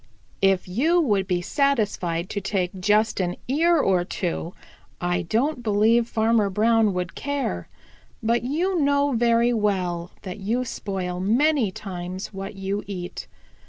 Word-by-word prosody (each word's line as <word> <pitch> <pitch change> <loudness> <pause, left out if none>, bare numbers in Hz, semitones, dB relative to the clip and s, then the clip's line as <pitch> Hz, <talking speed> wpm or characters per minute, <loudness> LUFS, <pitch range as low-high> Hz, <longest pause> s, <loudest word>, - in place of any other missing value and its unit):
If 195 -1 +3
you 295 - +2
would 205 - +1
be 180 -2 0
satisfied 205 - 0
to 200 - -2
take 190 -2 -1
just 210 +3 +2
an 180 -1 -1
ear 330 +6 +3
or 190 - +2
two, 175 -1 -3 0.4
I 175 0 0
don't 245 - 0
believe 225 +2 +3
Farmer 220 -2 +2
Brown 220 0 +3
would 180 -1 -3
care, 275 - -3 0.6
but 235 +2 +2
you 335 +9 0
know 285 0 +2
very 235 0 +3
well 180 -5 -1
that 185 +1 -6
you 230 +6 -1
spoil 185 -5 -4
many 240 +3 +2
times 185 0 -6
what 195 +1 -6
you 195 +1 -3
eat. 180 -3 -6
205 Hz, 140 wpm, -24 LUFS, 185-240 Hz, 0.6 s, If